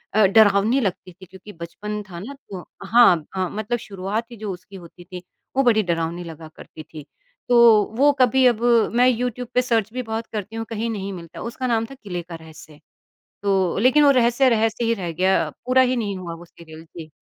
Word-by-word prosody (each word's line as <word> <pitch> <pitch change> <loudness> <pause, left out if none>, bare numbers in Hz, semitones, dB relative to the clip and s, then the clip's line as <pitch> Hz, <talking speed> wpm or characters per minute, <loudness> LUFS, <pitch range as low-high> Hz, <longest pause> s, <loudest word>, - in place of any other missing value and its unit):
अ, 215 - +5
डरावनी 210 +4 +4
लगती 190 -2 -4
थी 185 +1 -15
क्योंकि 190 +3 -14
बचपन 210 +5 -7
था 170 - -7
ना 230 +10 -8
तो 185 -3 -8 0.2
हाँ, 195 -9 +5
हाँ, 185 -1 -1
मतलब 215 +3 -3
शुरुआत 200 +3 -4
ही - - -9
जो 210 -2 -5
उसकी 185 +2 -13
होती 175 -1 -13
थी 180 0 -10 0.3
वो 270 - +4
बड़ी 220 -3 +3
डरावनी 170 0 -2
लगा 165 -1 -10
करती 155 - -12
थी। 155 -1 -12 0.4
तो 245 - +4 0.4
वो 285 +3 +5
कभी 255 +1 +4
अब 235 -2 +1 0.3
मैं 250 +1 +5
यूट्यूब 250 0 -2
पे 250 - +4
सर्च 225 -3 0
भी 255 - -3
बहुत 225 0 -5
करती 215 +1 -5
हूँ 225 - -4
कहीं 225 0 -3
नहीं 200 -3 -4
मिलता, 170 -2 -10
उसका 250 +2 -4
नाम 225 -1 0
था 275 - -12
किले 185 -8 -6
का 170 -1 -10
रहस्य। 160 -2 -14 0.6
तो 190 -3 0
लेकिन 260 +7 +4
वो 285 - +6
रहस्य 250 +1 +3
रहस्य 225 0 0
ही 230 - +1
रह 175 -6 -5
गया 185 +3 +1 0.2
पूरा 260 +1 +4
ही 255 0 +1
नहीं 205 -4 -3
हुआ 170 -2 -7
वो 170 - -12
सीरियल 160 -1 -14
जी। 155 -1 -9
205 Hz, 210 wpm, -22 LUFS, 175-235 Hz, 0.6 s, वो